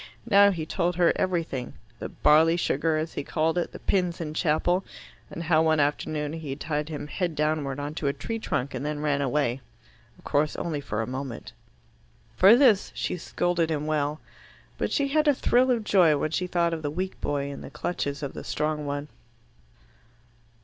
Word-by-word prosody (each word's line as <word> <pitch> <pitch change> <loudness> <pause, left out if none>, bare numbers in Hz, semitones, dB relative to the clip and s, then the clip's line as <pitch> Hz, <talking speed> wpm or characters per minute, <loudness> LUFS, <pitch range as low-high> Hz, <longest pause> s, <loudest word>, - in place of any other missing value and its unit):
Now 200 -2 +7
he 165 -5 -2
told 175 +1 -1
her 175 -1 +4
everything, 165 -9 -2 0.3
the - - -5
"barley 160 +3 +4
sugar," 160 -1 +1
as 155 +1 -3
he - - -3
called 160 +3 0
it, 175 - -3
the - - -8
pins 180 -3 0
in 155 -2 -4
chapel, 175 +4 +1 0.5
and 165 - -6
how 160 -1 +3
one 160 -1 +3
afternoon 150 +1 -1
he 160 -3 -6
had 135 +2 -4
tied 150 0 -2
him 150 -2 -5
head 170 +2 -3
downward 150 -2 -1
on 145 +1 -4
to 155 - -3
a 140 - +1
tree 225 +10 -4
trunk 140 - -2
and - - -4
then 150 0 -3
ran 145 -2 +1
away 135 -2 0 0.6
of - - -21
course 150 +1 +1
only 155 -4 -3
for 115 -5 -3
a - - -3
moment. 125 -3 -6 0.8
For 195 - +7
this 240 -7 +4
she - - -2
scolded 175 -1 -1
him 150 -2 -1
well. 150 0 -1 0.6
But - - -1
she 280 -2 +1
had 305 +2 +2
a 290 - +5
thrill 255 +1 +3
of 235 -3 +1
joy 175 -8 +4
when 155 +2 -2
she 180 +2 -1
thought 170 -2 +1
of 160 - -3
the 145 - -2
weak 185 +5 -4
boy 140 -1 -2
in 140 - -8
the - - -8
clutches 145 -5 -3
of 140 - -4
the - - -7
strong 150 -1 -2
one. 145 +1 -3
155 Hz, 200 wpm, -26 LUFS, 145-175 Hz, 0.8 s, Now